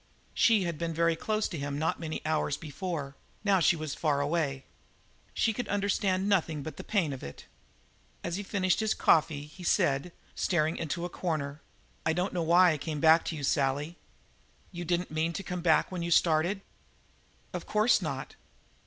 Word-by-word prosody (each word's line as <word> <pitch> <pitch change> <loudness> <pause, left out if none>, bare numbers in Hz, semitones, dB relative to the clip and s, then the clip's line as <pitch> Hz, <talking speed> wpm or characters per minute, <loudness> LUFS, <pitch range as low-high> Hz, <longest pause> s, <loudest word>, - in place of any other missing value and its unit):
She 220 -4 +4
had 170 -3 -3
been 165 -1 -2
very 165 0 +2
close 215 +5 -1
to 165 - -5
him 140 0 -3
not 160 +2 -1
many 160 -2 -5
hours 155 -2 0
before; 150 -2 -5 0.3
now 200 -2 +4
she 175 +1 +4
was 155 -3 -4
far 150 -3 0
away. 145 -2 -1 0.7
She 225 - +2
could 245 +3 -4
understand 200 -1 0
nothing 165 -7 +1
but 155 -1 -7
the - - -7
pain 180 -9 0
of 135 - -7
it. 70 - -9 0.8
As 170 - -2
he 200 - -3
finished 190 -2 0
his 220 -1 +1
coffee 150 -2 +3
he 155 +5 -13
said, 170 -3 +1 0.2
staring 160 -2 +1
into 170 +2 -3
a - - -4
corner: 155 -5 -3 0.4
"I 160 - +1
don't 180 +3 -1
know 175 - -1
why 175 +2 +5
I 155 - -2
came 150 +1 -4
back 160 +2 +6
to 165 - -3
you, 145 - -6
Sally." 140 +4 0 0.8
"You 175 -1 -6
didn't 175 +1 -1
mean 160 +2 0
to 195 - -4
come 180 -1 -4
back 165 +1 +3
when 180 -2 -3
you 170 - -2
started?" 170 +3 +3 0.9
"Of - - -5
course 215 +3 +3
not." - - -4
165 Hz, 185 wpm, -29 LUFS, 155-185 Hz, 0.9 s, back